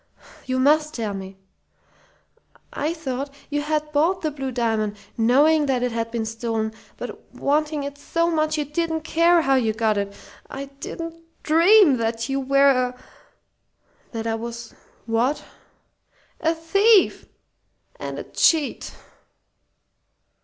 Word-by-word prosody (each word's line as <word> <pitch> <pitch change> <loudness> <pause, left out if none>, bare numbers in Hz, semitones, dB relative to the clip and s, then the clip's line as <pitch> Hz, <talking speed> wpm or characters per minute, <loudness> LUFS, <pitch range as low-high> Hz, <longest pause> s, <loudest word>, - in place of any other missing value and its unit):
"You 255 0 0
must 300 +3 +3
tell 220 -4 -3
me!" 190 0 -8 1.4
"I 300 +3 -1
thought 275 -4 -4 0.2
you 290 0 0
had 300 0 -2
bought 325 +6 +2
the 310 - 0
blue 270 -2 -4
diamond, 220 -4 -1 0.2
knowing 285 +6 +4
it 250 -2 +1
had 230 0 -2
been 230 -1 -3
stolen, 225 -1 -3 0.2
but - - -9
wanting 300 +1 0
it 285 0 -7
so 335 +3 0
much 310 -1 0
you 300 - -1
didn't 320 +2 -2
care 335 +2 +3
how 270 - +2
you 230 -5 +2
got 220 -2 +1
it. 200 0 -4 0.3
I 275 +1 -6
didn't 330 +4 -7 0.3
dream 335 -1 +6
that 230 +1 -2
you 270 0 0
were 275 +1 +4
a 250 -1 0 0.6
" - - -40
"That 225 -1 -5
I 225 - 0
was 235 0 -6 0.3
what?" 235 +6 0 1.0
"A 325 0 +1
thief 395 +6 +3 0.7
and - - -6
a - - -5
cheat!" 315 -4 +1
275 Hz, 135 wpm, -23 LUFS, 230-310 Hz, 1.4 s, dream